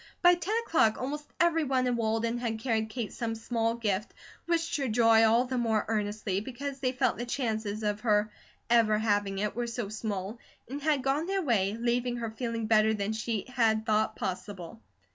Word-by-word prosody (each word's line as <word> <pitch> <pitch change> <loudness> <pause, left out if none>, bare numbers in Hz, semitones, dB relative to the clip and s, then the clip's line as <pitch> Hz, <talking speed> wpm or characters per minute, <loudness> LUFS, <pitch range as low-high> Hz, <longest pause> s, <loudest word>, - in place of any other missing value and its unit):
By 355 0 +8
ten 355 +5 -1
o'clock 225 - +3
almost 295 +3 -4
everyone 315 -7 +2
in 250 -1 +1
Walden 230 +1 0
had 230 -2 -2
carried 220 -2 -1
Kate 225 -1 -4
some 225 -1 -3
small 230 0 -1
gift, 210 -3 -2 0.3
wished 335 0 0
her 275 -2 -1
joy 225 -1 +5
all 230 +3 +4
the 255 0 -2
more 220 -3 +1
earnestly, 210 -2 -1
because 270 +4 -6
they 255 -2 0
felt 255 -1 0
the 240 - -2
chances 220 -4 -2
of 210 0 0
her 215 -2 +2 0.4
ever 230 -3 +4
having 205 -2 0
it 210 +1 -2
were 240 0 -2
so 230 -3 -4
small, 210 0 -4 0.3
and 280 +4 -6
had 290 -3 +1
gone 280 +5 0
their 390 0 0
way, 210 -6 +1
leaving 240 +1 0
her 230 -2 -4
feeling 230 0 -3
better 220 0 +4
than 205 +1 -2
she 220 -1 -2
had 225 -4 +1
thought 215 -1 +1
possible. 180 - -5
230 Hz, 185 wpm, -29 LUFS, 215-255 Hz, 0.4 s, By